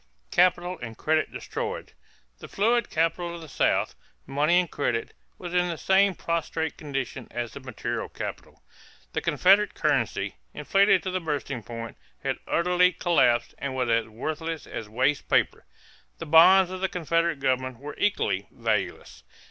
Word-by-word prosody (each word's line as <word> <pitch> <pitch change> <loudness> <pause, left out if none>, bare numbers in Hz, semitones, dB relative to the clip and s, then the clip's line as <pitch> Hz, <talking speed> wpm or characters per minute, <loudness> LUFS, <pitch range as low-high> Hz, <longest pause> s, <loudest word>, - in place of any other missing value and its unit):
=Capital 180 0 +2
and 115 -1 -8
Credit 155 0 +1
Destroyed.= 460 +1 -5 0.5
The - - -9
fluid 235 +3 +1
capital 170 +2 0
of 170 - -9
the 160 - -10
South, 135 - +1 0.3
money 150 +6 +3
and 180 -3 -2
credit, 120 -5 -2 0.2
was 175 -1 -7
in 180 0 +2
the 165 - -3
same 190 +1 +3
prostrate 165 -1 -2
condition 135 -5 -5
as 120 -1 -4
the - - -7
material 130 -3 -4
capital. - - -8 0.5
The - - -1
Confederate 200 +3 +4
currency, - - 0 0.2
inflated 195 -1 +3
to 185 - -3
the 185 0 -2
bursting 145 -5 -3
point, 115 +2 -8 0.3
had - - -2
utterly 180 +1 +3
collapsed 120 -9 +2
and 140 -1 -4
was 125 -2 0
as 115 -1 +2
worthless 155 +8 -4
as 110 -2 -7
waste 130 +6 0
paper. - - +1 0.5
The - - -6
bonds 180 +4 +7
of 185 0 -6
the 190 - +1
Confederate 165 -2 0
government 130 -2 0
were 145 +4 -8
equally 100 - 0
valueless. 100 - -2
160 Hz, 155 wpm, -26 LUFS, 130-180 Hz, 0.5 s, bonds